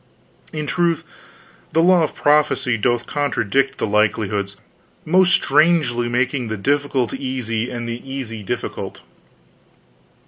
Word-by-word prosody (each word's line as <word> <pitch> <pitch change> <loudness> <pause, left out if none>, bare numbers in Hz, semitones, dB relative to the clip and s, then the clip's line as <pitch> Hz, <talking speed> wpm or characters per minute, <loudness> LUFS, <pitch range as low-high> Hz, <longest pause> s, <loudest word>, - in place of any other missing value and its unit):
In 155 -1 -4
truth, 170 +1 0 0.7
the 165 - +4
law 180 0 +5
of 155 - -1
prophecy 145 -4 +2
doth 120 +2 0
contradict 135 -2 0
the - - -1
likelihoods, 105 -2 0 0.5
most 185 +3 +4
strangely 150 -7 +3
making 125 +1 0
the 110 0 -3
difficult 140 +1 0
easy, 130 -4 -3
and 120 -1 -5
the 115 +1 -5
easy 120 -5 -5
difficult." 100 - -5
130 Hz, 115 wpm, -20 LUFS, 115-150 Hz, 0.7 s, law